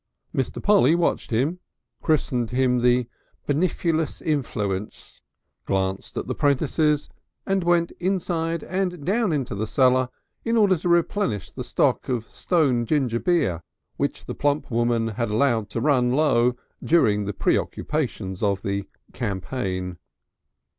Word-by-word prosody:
Mr. 130 - -2
Polly 200 -5 +5
watched 175 - 0
him, 140 +10 0 0.4
christened 125 -7 +1
him 125 0 +2
the 125 0 +3 0.4
"benifluous 160 0 0
influence," 105 -9 -3 0.5
glanced 95 0 -2
at - - -2
the - - -2
'prentices 150 +1 +1 0.4
and 195 -1 +1
went 170 -1 +2
inside 170 -3 -1
and 180 -4 -2
down 210 +2 +1
into 140 -7 -1
the 105 +2 -2
cellar 130 +1 +3 0.3
in 230 0 +1
order 205 -4 +5
to 175 +1 -3
replenish 170 - +1
the - - -6
stock - - +1
of 120 -3 -1
stone 140 -9 +1
ginger 125 -2 0
beer 140 - +1 0.4
which - - -2
the - - -5
plump 145 -1 0
woman 120 -1 +1
had 115 +2 -2
allowed 110 -1 +1
to - - -3
run 125 -2 +2
low 125 -4 +3 0.3
during 105 -11 +3
the 105 - -2
preoccupations 110 -6 -1
of 100 -2 0
the 100 0 -2 0.3
campaign. 95 -5 -3
130 Hz, 135 wpm, -24 LUFS, 115-165 Hz, 0.5 s, Polly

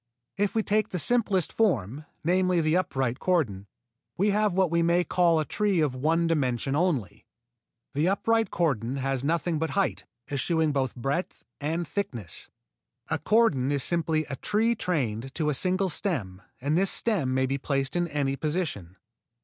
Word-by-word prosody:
If 205 +2 -1
we 220 - +2
take 215 0 +1
the 180 - -3
simplest 200 -2 +2
form, 150 - 0 0.2
namely 180 +1 +2
the 155 0 +2
upright 135 -8 -1
cordon, 115 - 0 0.5
we 205 +3 +2
have 210 -2 +1
what 185 -3 +2
we 170 0 +2
may 170 +1 +3
call 170 -2 +2
a 155 - -1
tree 205 -1 0
of 150 -4 +1
one 160 +6 +1
dimension 135 -4 0
only. 150 - -1 0.7
The 150 +4 +1
upright 225 +3 +1
cordon 135 -7 0
has 135 -1 -1
nothing 165 +1 0
but 160 0 -1
height, 195 - 0 0.2
eschewing 155 +3 0
both 135 -3 -1
breadth 135 +8 -3
and 160 +3 -2
thickness. 120 - -5 0.6
A - - +1
cordon 165 - +2
is 140 -2 0
simply 160 -1 +1
a 135 - -6
tree 220 - +1
trained 135 - -2
to 150 -2 0
a - - -1
single 185 +5 +1
stem 115 - -1 0.2
and 145 +4 0
this 190 +2 +3
stem 170 - 0
may 130 0 +2
be 135 +1 -2
placed 135 +1 -1
in 175 0 +1
any 140 -3 -1
position. 145 - -3
160 Hz, 165 wpm, -27 LUFS, 135-185 Hz, 0.7 s, may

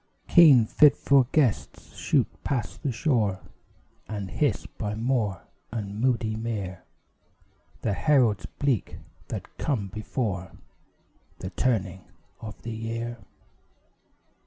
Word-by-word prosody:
Keen 145 - +7
fitful 140 0 +4
gusts 135 -9 0
shoot - - +2 0.2
past 120 -9 -3
the 140 - -1
shore 115 - +1 0.7
And 100 -3 -5
hiss 145 -9 0
by 105 -1 -5
moor 110 -6 -1 0.3
and 105 -2 -4
moody 115 -4 +1
mere 105 -5 -4 1.0
The 105 - +1
heralds 125 -4 +2
bleak 135 -8 -1 0.3
that - - -7
come 110 -10 -1
before 100 -2 -3 0.8
The 95 +1 -6
turning 95 -4 -1 0.3
of 110 -2 -9
the 115 - -5
year. 115 +1 -4
115 Hz, 105 wpm, -26 LUFS, 100-130 Hz, 1.0 s, Keen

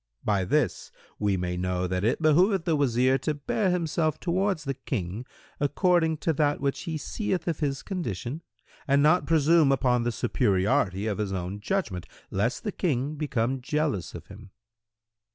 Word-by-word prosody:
By 100 -3 +1
this 145 +2 0 0.3
we 100 -2 +1
may 90 0 -2
know 90 0 -1
that 90 +1 -2
it 120 +9 +1
behoveth 175 +4 +4
the 165 -3 +2
Wazir 130 -1 +2
to 155 - -1
bear 185 +7 0
himself 160 -3 0
towards 185 -1 0
the 135 -2 -2
King 110 -3 -4 0.3
according 160 +2 +2
to 165 - +3
that 145 0 +1
which 140 +4 -2
he 160 -3 -2
seeth 190 +4 -3
of 165 -3 -1
his 140 -3 -2
condition 160 - -4 0.5
and 140 +1 +4
not 155 +4 +4
presume 160 -1 +4
upon 125 -2 +2
the 120 0 0
superiority 100 -4 +1
of 110 -1 -2
his 105 -2 -1
own 95 +1 -4
judgment, 105 - -2 0.2
lest 110 +8 -1
the 210 - -2
King 145 -6 -1
become 135 -4 -1
jealous 150 - -1
of - - -9
him." 95 - -13
140 Hz, 165 wpm, -27 LUFS, 105-160 Hz, 0.5 s, behoveth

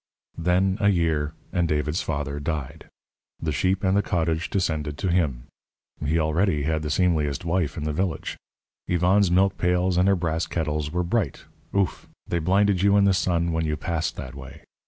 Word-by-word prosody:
Then 95 +4 +2
a 100 - +5
year, 80 -5 0 0.2
and 85 -1 +1
David's 75 +2 0
father 70 -1 -3
died. 75 -3 -5 0.5
The 80 - -2
sheep 90 +7 0
and 95 0 +2
the 100 - +4
cottage 80 -3 -1
descended 80 -6 -1
to 95 - -1
him. 75 -9 0 0.6
He 75 +3 +1
already 80 0 +1
had 80 +1 0
the 75 - -3
seemliest 75 -3 +1
wife 85 -2 0
in 75 - -3
the 75 0 -1
village. 90 +1 -2 0.5
Yvonne's 90 +3 +3
milk 95 +2 +2
pails 90 0 +1
and 90 +2 +4
her 100 - +4
brass 80 -2 -1
kettles 75 -2 -2
were 90 +2 0
bright 90 - -1 0.3
ouf! 100 -2 0 0.2
they 85 - -1
blinded 95 +3 +2
you 100 +1 +4
in 100 - +5
the 100 -1 +4
sun 85 -2 +1
when 80 -1 0
you 75 0 -1
passed 85 -1 -2
that - - -7
way. 70 -1 -11
85 Hz, 180 wpm, -25 LUFS, 75-95 Hz, 0.6 s, a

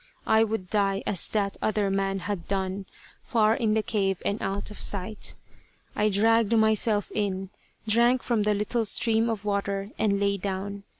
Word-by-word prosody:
I 220 0 +4
would 220 -4 -2
die 200 -2 +1
as 190 - 0
that 200 -2 -1
other 210 -2 0
man 195 0 -1
had 195 -3 -4
done, 190 0 -2 0.4
far 220 -2 +3
in 220 -2 +1
the 220 - +1
cave 195 -4 0
and 200 +2 -1
out 195 +2 -3
of 210 - -10
sight. 200 +2 -2 0.6
I 210 +1 +2
dragged 225 +2 +3
myself 220 -1 +2
in, 195 -2 -2 0.4
drank 235 +3 +3
from 235 -3 +1
the 210 0 +2
little 220 +3 -1
stream 225 +2 +2
of 215 -2 -3
water, 200 0 -2
and 200 -2 +2
lay 200 0 +1
down. 200 +1 -4
205 Hz, 170 wpm, -26 LUFS, 195-220 Hz, 0.6 s, I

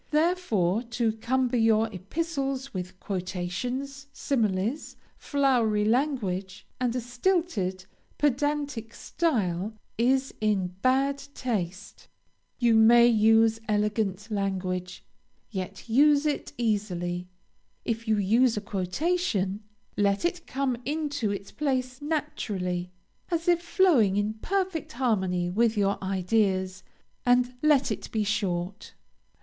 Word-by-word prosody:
Therefore 300 - +1
to 235 -1 -1
cumber 250 +2 0
your 225 -1 +4
epistles 275 - -3
with 185 0 -6
quotations, 230 +10 -4
similes, 225 -1 -1 0.2
flowery 245 -7 +1
language, 210 -7 -1
and 250 -1 0
a - - +1
stilted, 245 - -1 0.3
pedantic 285 -4 -1
style, 215 - -1 0.2
is 260 +3 +2
in 195 -4 +1
bad 270 +2 +2 0.2
taste. 200 -6 -4 0.5
You 240 -2 +3
may 230 +2 +7
use 225 0 +4
elegant 210 0 0
language, 185 -3 -3 0.5
yet 190 +1 -6
use 285 +5 +4
it 295 -1 -1
easily. 180 -6 -1 0.6
If 230 0 -2
you 215 -1 +3
use 225 +4 +3
a - - -1
quotation, 200 - -1 0.4
let 200 +5 +2
it 350 0 -2
come 265 -2 -1
into 290 -6 -2
its 200 0 -5
place 260 -2 -2
naturally, 210 - -2 0.4
as 335 -1 -2
if 345 -1 +4
flowing 320 - +3
in 205 +1 0
perfect 370 - -2
harmony 190 -8 0
with 225 +3 +2
your 200 -1 +1
ideas, 190 -1 0 0.4
and 245 0 +3
let 285 -5 +3
it 215 - -5
be 215 -1 0
short. 200 -2 -2
225 Hz, 110 wpm, -27 LUFS, 195-275 Hz, 0.6 s, may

